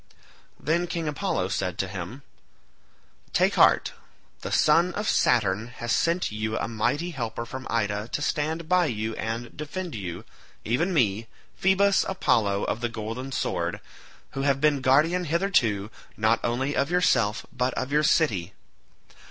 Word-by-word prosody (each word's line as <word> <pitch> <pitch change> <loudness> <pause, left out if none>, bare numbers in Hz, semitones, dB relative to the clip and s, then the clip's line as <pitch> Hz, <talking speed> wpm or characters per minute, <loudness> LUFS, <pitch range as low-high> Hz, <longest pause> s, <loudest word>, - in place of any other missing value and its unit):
Then 170 +4 0
King 165 -2 -3
Apollo 150 - -1
said 90 -2 -2
to 95 - -1
him, 95 +8 -7 1.1
"Take - - +3
heart; - - +4 0.5
the - - -6
son 170 +4 +3
of 210 +1 -2
Saturn 110 -2 +2
has 120 0 -4
sent 170 -3 +1
you 110 +1 -2
a - - -2
mighty 145 +10 -1
helper 115 -5 -4
from 130 +2 -7
Ida 105 -2 -1
to - - -1
stand 155 +2 -2
by 180 -1 +3
you 110 -2 -3
and 115 +2 -4
defend 160 +3 -5
you, 95 -1 -6 0.4
even 145 - +1
me, 115 - +1 0.3
Phoebus 190 +1 +3
Apollo 105 - +1
of 120 - -2
the 120 - -1
golden 115 +4 -5
sword, 85 -8 -2 0.5
who 135 - -4
have 135 -1 +2
been 145 -1 +2
guardian 155 +8 +3
hitherto 135 - +1 0.3
not 110 +1 +3
only 130 +4 -1
of 140 - +1
yourself 140 -12 +2
but 125 0 0
of 130 +2 -3
your 150 +1 +3
city. 105 - +1
130 Hz, 150 wpm, -26 LUFS, 110-160 Hz, 1.1 s, heart